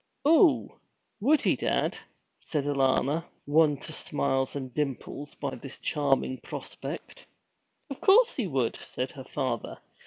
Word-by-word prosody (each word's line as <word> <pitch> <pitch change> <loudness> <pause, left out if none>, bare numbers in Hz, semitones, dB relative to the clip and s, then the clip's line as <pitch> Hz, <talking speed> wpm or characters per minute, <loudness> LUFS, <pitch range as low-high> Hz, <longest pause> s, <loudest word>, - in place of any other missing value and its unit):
'Oo 325 +1 +4 0.4
would 285 +8 +3
he, - - +3
dad?' - - 0 0.4
said 150 -3 -2
Alanna, 140 +2 +2 0.2
won 150 0 +4
to 155 - -5
smiles 135 -3 -1
and 130 -3 -5
dimples 145 0 -4
by 140 -2 -4
this 130 +2 -8
charming 135 -3 0
prospect. - - -7 0.6
'Of 275 -3 -8
course 455 +5 +6
he 240 -7 -1
would!' 135 -7 0
said 130 +1 -4
her 130 -2 -10
father. 130 -5 -3
145 Hz, 130 wpm, -28 LUFS, 135-165 Hz, 0.6 s, course